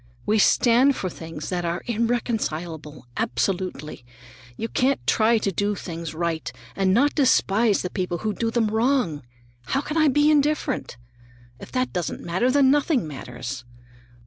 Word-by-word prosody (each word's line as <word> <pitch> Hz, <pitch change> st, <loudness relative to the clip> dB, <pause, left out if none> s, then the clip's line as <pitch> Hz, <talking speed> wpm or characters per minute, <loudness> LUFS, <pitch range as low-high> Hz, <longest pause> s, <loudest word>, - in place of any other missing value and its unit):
We 215 Hz, +1 st, +2 dB
stand 250 Hz, +6 st, +4 dB
for 185 Hz, -, -3 dB
things 160 Hz, -2 st, -8 dB
that 180 Hz, -1 st, -2 dB
are 170 Hz, 0 st, -2 dB
irreconcilable, 190 Hz, -, -2 dB
absolutely. 155 Hz, 0 st, -2 dB, 0.5 s
You 225 Hz, -, -3 dB
can't 260 Hz, +3 st, 0 dB
try 225 Hz, +1 st, +3 dB
to 205 Hz, -2 st, -1 dB
do 205 Hz, +3 st, -1 dB
things 165 Hz, -4 st, -6 dB
right 160 Hz, -6 st, -2 dB, 0.2 s
and 190 Hz, -1 st, +2 dB
not 275 Hz, +9 st, +3 dB
despise 230 Hz, -6 st, +3 dB
the 180 Hz, -, -4 dB
people 180 Hz, -3 st, -2 dB
who 215 Hz, +3 st, -2 dB
do 230 Hz, +1 st, -1 dB
them 225 Hz, -2 st, +1 dB
wrong. 220 Hz, -, +1 dB, 0.5 s
How 270 Hz, -, 0 dB
can 300 Hz, +2 st, -4 dB
I 310 Hz, -1 st, +5 dB
be 295 Hz, +2 st, +4 dB
indifferent? 295 Hz, -, 0 dB, 0.6 s
If -, -, -11 dB
that 255 Hz, 0 st, -1 dB
doesn't 175 Hz, -3 st, -3 dB
matter, 185 Hz, +9 st, +1 dB
then 270 Hz, 0 st, +4 dB
nothing 290 Hz, -, +1 dB
matters. 125 Hz, -3 st, -7 dB
210 Hz, 150 wpm, -24 LUFS, 170-255 Hz, 0.6 s, I